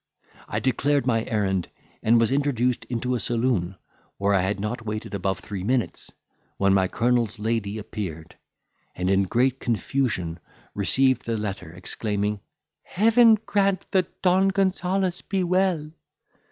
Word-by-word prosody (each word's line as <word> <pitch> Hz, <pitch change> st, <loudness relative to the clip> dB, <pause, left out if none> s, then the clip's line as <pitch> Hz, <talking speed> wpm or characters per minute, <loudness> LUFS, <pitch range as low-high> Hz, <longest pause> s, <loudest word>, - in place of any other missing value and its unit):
I -, -, -2 dB
declared 140 Hz, +1 st, +1 dB
my 115 Hz, -3 st, +1 dB
errand, 95 Hz, -6 st, -1 dB, 0.3 s
and 115 Hz, +1 st, +4 dB
was 115 Hz, +1 st, +2 dB
introduced 125 Hz, -3 st, 0 dB
into 125 Hz, +1 st, -2 dB
a 125 Hz, -, 0 dB
saloon, 115 Hz, -5 st, 0 dB, 0.4 s
where 100 Hz, +1 st, +1 dB
I 95 Hz, -, +3 dB
had 95 Hz, +2 st, -1 dB
not 110 Hz, +3 st, -3 dB
waited 110 Hz, -1 st, -5 dB
above 95 Hz, -1 st, -1 dB
three 95 Hz, 0 st, -6 dB
minutes, 125 Hz, +2 st, -1 dB, 0.5 s
when 100 Hz, 0 st, +3 dB
my 95 Hz, -1 st, +3 dB
colonel's 120 Hz, 0 st, 0 dB
lady 110 Hz, -1 st, -2 dB
appeared, 95 Hz, -7 st, -6 dB, 0.6 s
and 90 Hz, +1 st, 0 dB
in 95 Hz, 0 st, +3 dB
great 125 Hz, +6 st, +1 dB
confusion 110 Hz, -8 st, -1 dB, 0.3 s
received 130 Hz, +5 st, +2 dB
the 115 Hz, -1 st, 0 dB
letter, 100 Hz, -5 st, -4 dB
exclaiming, 105 Hz, +3 st, -2 dB, 0.4 s
"Heaven 225 Hz, +3 st, +5 dB
grant 200 Hz, -2 st, +1 dB
that 185 Hz, -3 st, -1 dB
Don 190 Hz, +1 st, +4 dB
Gonzales 190 Hz, -1 st, 0 dB
be 190 Hz, -1 st, -1 dB
well!" 180 Hz, -4 st, +1 dB
115 Hz, 140 wpm, -25 LUFS, 100-145 Hz, 0.6 s, Heaven